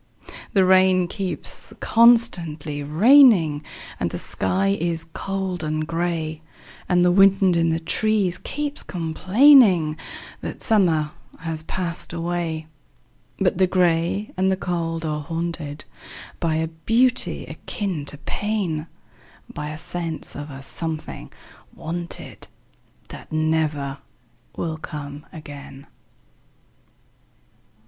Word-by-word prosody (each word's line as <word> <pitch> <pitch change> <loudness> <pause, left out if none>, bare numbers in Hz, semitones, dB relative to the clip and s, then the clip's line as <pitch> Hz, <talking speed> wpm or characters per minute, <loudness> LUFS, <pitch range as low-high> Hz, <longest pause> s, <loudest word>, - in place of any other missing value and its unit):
The 190 -2 +4
rain 185 -1 +5
keeps 190 0 -4
constantly 175 -11 +3
raining, 170 - +5 0.4
And - - 0
the - - -5
sky 195 +1 0
is 165 -1 -1
cold 185 +1 -4
and 155 0 -1
gray, 165 -1 -2 0.5
And 180 -1 +4
the 180 - +5
wind 195 -1 +5
in 165 0 +2
the 165 0 0
trees 195 +2 0
keeps 290 0 -4
complainingThat 185 - +3
summer 165 -8 +2 0.3
has 165 -1 -3
passed 170 0 -4
away;—But 160 - -4
the 185 - +5
gray 180 +2 +1
and 190 +1 +2
the 190 - 0
cold 165 -2 -2
are 150 -1 -2
hauntedBy 165 0 -4
a - - -2 0.2
beauty 245 +2 +2
akin 190 -8 -4
to 145 - -4
pain,—By 160 -5 -5
a 155 - -6
sense 170 -1 -5
of 145 +1 -6
a 135 -1 -9
something 160 +2 -5 0.4
wanted, 170 +1 -6 0.6
That - - -11
never 155 -3 0 0.6
will 160 -2 -3
come 145 -2 -7
again. 145 -4 -10
170 Hz, 100 wpm, -23 LUFS, 155-190 Hz, 0.6 s, rain